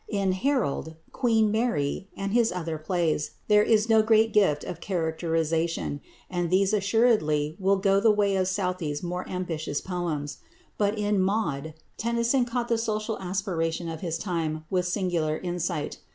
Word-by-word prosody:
In 200 -3 +1
"Harold," 190 - -1 0.2
"Queen 225 -3 +2
Mary," 200 -7 0
and 200 0 -3
his 235 -1 +3
other 165 -3 -4
plays 160 -2 -1
there 210 -1 +6
is 215 0 +3
no 220 -1 +5
great 220 0 +3
gift 170 -9 +3
of - - -6
characterisation, 165 -3 -1 0.3
and 175 -2 -2
these 190 +3 +3
assuredly 200 -8 +2
will 195 +1 +3
go 195 0 +3
the 220 +2 +4
way 205 -2 +3
of 185 -1 +1
Southey's 180 -6 -2
more 180 +1 -4
ambitious 165 -5 -3
poems. 170 -6 -4 0.4
But 205 +1 +1
in 205 -2 +1
"Maud" 175 -7 -1 0.2
Tennyson 235 +3 +1
caught 240 0 -2
the 230 -1 +1
social 215 -1 -2
aspiration 180 -3 -2
of 160 -1 -6
his 165 -2 -2
time 160 -4 -3
with 180 -1 +1
singular 175 -5 0
insight. 175 -4 -3
185 Hz, 150 wpm, -26 LUFS, 165-215 Hz, 0.4 s, there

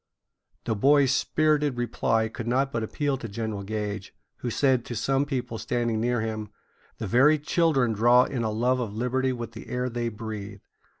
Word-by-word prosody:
The - - 0
boys' 135 +5 +4
spirited 150 -1 +1
reply 115 -2 0
could 115 +1 -7
not 135 +3 +1
but 115 - -2
appeal 140 +5 -1
to 115 - -6
General 110 -1 -4
Gage, 105 -1 -4 0.2
who 125 - -4
said 130 0 +2
to 120 - -5
some 135 +5 +1
people 125 -5 -3
standing 120 -2 -1
near 120 0 +1
him: 110 -1 -4 0.5
"The 110 - -4
very 135 +10 +5
children 150 -5 +2
draw 120 +4 +5
in 125 -2 -3
a 110 - 0
love 125 +4 +1
of 110 -4 -4
liberty 130 +3 0
with 120 -2 -5
the 115 - -10
air 125 +1 -1
they 120 0 -2
breathe." 105 -2 -7
120 Hz, 180 wpm, -26 LUFS, 110-130 Hz, 0.5 s, very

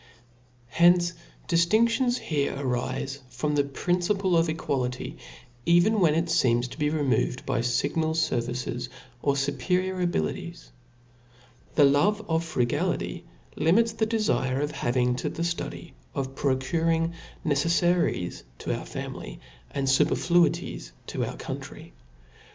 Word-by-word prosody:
Hence 175 +3 +4 0.3
difiindions 230 +9 +3
here 145 -3 -1
arile 135 +1 -2
from 130 +4 -2
the 145 -1 +3
principle 180 +6 0
of 165 0 +3
equality, 130 -5 -2 0.4
even 175 - +4
when 160 -5 +4
it 165 +1 +2
feems 120 -5 +2
to - - -10
be 150 0 +2
removed 145 -4 0
by - - 0
iignal 140 +7 0
fervices, 125 -5 -1 0.3
or 140 -1 +2
fuperior 180 +7 0
abilities. 80 - -2 1.0
The 150 - +6
love 190 +10 +3
of 160 0 +1
frugality 125 -7 -1 0.3
limits 210 +9 +3
the 220 0 0
dtfin 145 - +1
of 150 - -2
having 125 0 0
to - - -2
the 170 - -4
ftudy 170 0 -4 0.2
of 135 -1 -3
procuring 165 +5 0 0.3
neceffaries 165 - +1 0.2
to - - -2
our - - -7
family, - - -6 0.3
and 140 -1 -2
fuperfiuities 170 +6 +2
to - - -3
our - - -6
country. - - -7
155 Hz, 120 wpm, -27 LUFS, 130-175 Hz, 1.0 s, The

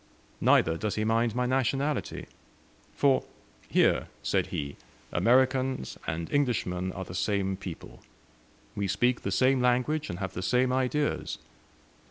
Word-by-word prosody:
Neither 80 0 +4
does 105 +3 -2
he 110 - 0
mind 115 +1 +1
my 125 0 +1
nationality; 135 +3 -1 0.7
for 140 -2 +3 0.5
'here,' - - +3 0.2
said - - +1
he, 70 -1 -4 0.4
'Americans 130 - +2
and 80 +2 -2
Englishmen 95 -10 0
are 95 - -5
the 90 - -9
same 95 +1 0
people. 95 -3 -9 0.7
We 100 -1 -1
speak 120 +6 +1
the - - -3
same 130 +5 +3
language 125 +5 +1
and 85 - -4
have 95 0 -4
the 90 - -4
same 125 +6 +2
ideas.' 130 +3 0
120 Hz, 135 wpm, -28 LUFS, 95-130 Hz, 0.7 s, Neither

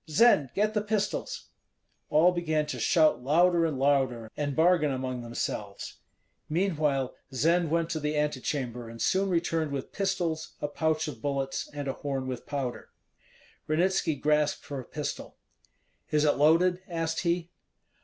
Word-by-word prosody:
Zend, 155 - +5
get 210 +2 +1
the 210 - +1
pistols!" 215 - -2 0.6
All 165 +4 +5
began 160 -3 0
to 150 - -5
shout 155 -7 +3
louder 170 +4 +4
and 150 -4 -3
louder, 130 -5 +1
and 145 -2 -2
bargain 160 -2 +4
among 130 -1 -3
themselves; 105 -3 -5 0.5
meanwhile 150 -6 0 0.2
Zend 165 +5 +2
went 165 +1 0
to 160 - -1
the 150 0 -1
antechamber, 130 -5 -2
and 115 0 -10
soon 195 +8 +1
returned 165 -3 0
with 140 -1 -4
pistols, 175 -5 -2
a 145 - -2
pouch 160 +1 0
of 150 - -7
bullets, 140 -2 -2
and 145 -1 -5
a 135 - -1
horn 135 -2 -3
with 130 -2 -5
powder. 135 -4 -4 0.8
Ranitski 165 0 +2
grasped 150 0 +1
for 140 -2 -5
a 125 - -8
pistol. 150 -1 -5 0.7
"Is 150 0 +2
it 145 - +3
loaded?" 170 +5 +4
asked 165 -2 -2
he. 170 -1 -1
155 Hz, 150 wpm, -28 LUFS, 140-170 Hz, 0.8 s, Zend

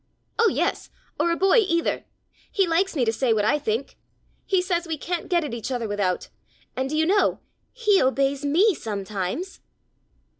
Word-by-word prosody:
"Oh, 460 -1 +5
yes, - - -1 0.3
or 340 - +2
a 335 - +2
boy 385 +6 +4
either! 335 -5 0 0.5
He 390 - +2
likes 350 +3 +1
me 260 -5 +2
to 225 - +1
say 240 0 +1
what 210 -1 +1
I 295 - +2
think! 255 0 -3 0.5
He 380 - +3
says 350 -2 -1
we 320 -1 -2
can't 340 +3 -4
get 345 -3 +2
at 290 - -5
each 235 +2 -4
other 240 -3 -2
without. 200 -3 -1 0.5
And 260 +1 -2
do 305 - -1
you 315 - +3
know 400 +4 +2 0.3
he 425 -5 +3
obeys 275 +2 +1
me 355 +9 +4
sometimes!" 210 - -4
305 Hz, 180 wpm, -24 LUFS, 235-365 Hz, 0.5 s, Oh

